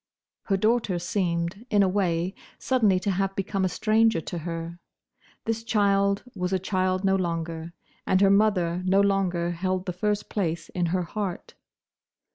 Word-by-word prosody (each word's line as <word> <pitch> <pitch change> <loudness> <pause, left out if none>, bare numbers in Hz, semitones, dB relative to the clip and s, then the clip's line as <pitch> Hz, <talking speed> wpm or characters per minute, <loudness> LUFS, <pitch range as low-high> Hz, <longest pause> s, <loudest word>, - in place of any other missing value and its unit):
Her 195 - +1
daughter 215 -2 +1
seemed, 175 +1 -2
in 205 -1 +4
a - - +3
way, 185 -2 0 0.2
suddenly 215 -8 +2
to 200 - 0
have 195 +1 -1
become 195 0 -1
a 185 - +2
stranger 220 0 +2
to 170 +2 -5
her. 165 +1 -5 0.7
This 225 0 -2
child 200 -2 +2
was 180 -1 -2
a 190 - +2
child 185 0 0
no 195 0 +3
longer, 165 -2 -3 0.3
and 185 - +3
her 195 0 +5
mother 185 -4 +2
no 190 +1 +3
longer 190 -4 +1
held 185 +2 -2
the 180 - -3
first 210 +3 -1
place 170 -5 -2
in 175 -1 -1
her 180 +2 0
heart. 190 +1 -5
185 Hz, 160 wpm, -26 LUFS, 175-200 Hz, 0.7 s, her